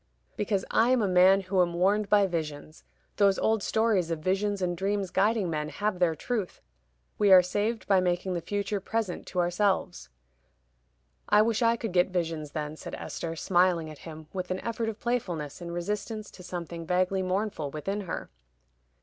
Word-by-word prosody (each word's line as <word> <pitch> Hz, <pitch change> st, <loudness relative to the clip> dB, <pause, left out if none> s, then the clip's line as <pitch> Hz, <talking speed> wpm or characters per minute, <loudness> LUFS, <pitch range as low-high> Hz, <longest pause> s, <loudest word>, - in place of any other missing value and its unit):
"Because 200 Hz, -2 st, -1 dB
I 230 Hz, +2 st, +4 dB
am 255 Hz, -3 st, +3 dB
a -, -, +2 dB
man 185 Hz, +1 st, +5 dB
who 185 Hz, 0 st, +1 dB
am 175 Hz, -1 st, 0 dB
warned 200 Hz, +4 st, +2 dB
by 205 Hz, -1 st, +5 dB
visions. 155 Hz, -3 st, -5 dB, 0.3 s
Those 200 Hz, -2 st, +4 dB
old 220 Hz, -1 st, +1 dB
stories 215 Hz, -6 st, +1 dB
of 165 Hz, -, -1 dB
visions 195 Hz, +5 st, 0 dB
and 180 Hz, -1 st, -1 dB
dreams 195 Hz, +1 st, -1 dB
guiding 210 Hz, 0 st, +2 dB
men 155 Hz, -2 st, -2 dB
have 205 Hz, 0 st, -2 dB
their 170 Hz, -3 st, +2 dB
truth; 210 Hz, +2 st, -3 dB, 0.6 s
we 205 Hz, -2 st, +4 dB
are 185 Hz, -1 st, +9 dB
saved 210 Hz, +5 st, -1 dB
by 195 Hz, -2 st, +5 dB
making 180 Hz, +1 st, 0 dB
the 175 Hz, -, -2 dB
future 205 Hz, +2 st, -2 dB
present 205 Hz, -1 st, -3 dB
to 180 Hz, -, -3 dB
ourselves." 180 Hz, +1 st, 0 dB, 1.2 s
"I 210 Hz, +1 st, +6 dB
wish 225 Hz, 0 st, 0 dB
I 230 Hz, 0 st, +4 dB
could 225 Hz, -3 st, -4 dB
get 180 Hz, -1 st, +4 dB
visions, 165 Hz, -5 st, -3 dB
then," 150 Hz, 0 st, -4 dB
said -, -, -7 dB
Esther, 165 Hz, -1 st, -5 dB
smiling 175 Hz, -2 st, +2 dB
at 150 Hz, -, -12 dB
him, 160 Hz, -1 st, -10 dB
with 185 Hz, -1 st, -4 dB
an 185 Hz, 0 st, -2 dB
effort 230 Hz, -1 st, -2 dB
of 220 Hz, -1 st, -7 dB
playfulness, 180 Hz, -, -3 dB
in 170 Hz, -, -6 dB
resistance 205 Hz, +5 st, -4 dB
to -, -, -13 dB
something 170 Hz, -2 st, -6 dB
vaguely 185 Hz, +2 st, +1 dB
mournful 185 Hz, -4 st, -2 dB
within 195 Hz, +8 st, -3 dB
her. 180 Hz, -4 st, -6 dB
185 Hz, 180 wpm, -28 LUFS, 175-210 Hz, 1.2 s, are